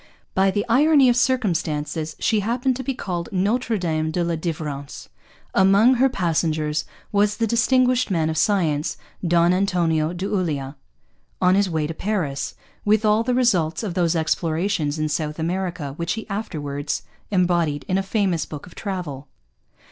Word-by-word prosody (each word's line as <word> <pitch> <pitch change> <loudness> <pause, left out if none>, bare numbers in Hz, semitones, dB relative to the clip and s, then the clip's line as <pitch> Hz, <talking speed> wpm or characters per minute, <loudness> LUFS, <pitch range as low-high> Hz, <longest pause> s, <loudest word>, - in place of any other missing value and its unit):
By 195 +1 +3
the 205 +2 -1
irony 275 +2 +5
of 240 - +3
circumstances 165 - 0
she 220 - +1
happened 245 +5 0
to 260 - -5
be 265 +1 -2
called 175 -7 -4
Notre 220 +4 0
Dame 160 -3 -1
de 175 +2 -1
la 170 0 0
Delivrance. 155 -4 -5 0.4
Among 200 +6 +5
her 260 +2 +3
passengers 155 - 0 0.3
was 205 0 +2
the 230 - +1
distinguished 250 +2 +2
man 165 -5 +1
of 160 - -2
science, 160 -7 +1 0.3
Don 170 0 +3
Antonio 170 -5 +1
de 180 +2 -4
Ulloa, 155 -9 -2 0.6
on 180 0 +4
his 200 0 +2
way 160 -3 -1
to 160 - -4
Paris, 165 -7 -2 0.3
with 215 +1 +2
all 215 +1 +4
the 245 +1 0
results 190 -9 +2
of 200 -5 -3
those 175 -2 +1
explorations 160 0 0
in 155 0 0
South 150 0 -2
America 170 -3 -3
which 170 +1 -1
he 220 - -5
afterwards 145 -9 -3 0.3
embodied 175 -6 +1
in 190 +1 +1
a - - +1
famous 190 -5 0
book 150 -2 -8
of 180 - -14
travel. 175 -9 -5
180 Hz, 160 wpm, -22 LUFS, 155-210 Hz, 0.6 s, irony